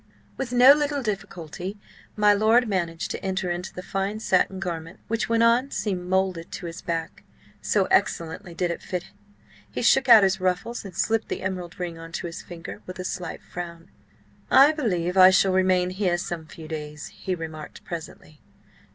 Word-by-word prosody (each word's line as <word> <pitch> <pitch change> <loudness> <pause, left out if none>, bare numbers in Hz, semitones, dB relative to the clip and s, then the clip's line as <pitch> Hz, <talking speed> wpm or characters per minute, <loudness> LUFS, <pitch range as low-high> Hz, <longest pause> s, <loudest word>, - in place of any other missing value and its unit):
With 265 -3 -4
no 250 +3 +8
little 290 -1 -1
difficulty, 195 -2 -5 0.4
my 210 -1 +5
lord 220 +4 +4
managed 170 -5 -2
to - - -5
enter 190 -2 -1
into 175 +2 -4
the 180 - -8
fine 195 +3 -2
satin 190 -2 +1
garment, 170 -2 -5
which, 225 0 -1
when 230 0 +3
on, 240 +4 +4
seemed 185 -8 -3
moulded 185 -2 0
to 180 - -6
his 170 +1 -7
back, 165 -1 -4 0.4
so - - +2
excellently 170 +2 0
did 175 0 0
it 170 - -5
fit. 180 -1 -5 0.6
He - - -4
shook 265 - +4
out 220 -3 +10
his 190 -1 +2
ruffles 185 +6 -1
and 195 -3 -10
slipped 225 0 0
the - - -4
emerald 185 -1 -4
ring 170 -2 -4
on 165 0 -10
to - - -4
his 170 -1 -6
finger 175 -1 -9
with 185 0 -7
a 185 - -5
slight 180 -2 -5
frown. 170 0 -8 0.6
"I 280 +3 +7
believe 190 - -1
I 185 0 +10
shall 190 0 +4
remain 185 -1 +2
here 185 -2 0
some 170 -2 -5
few 160 -1 -11
days," 150 -1 -6
he 185 - -4
remarked 160 -2 -8
presently. 160 -2 -8
185 Hz, 180 wpm, -25 LUFS, 170-210 Hz, 0.6 s, out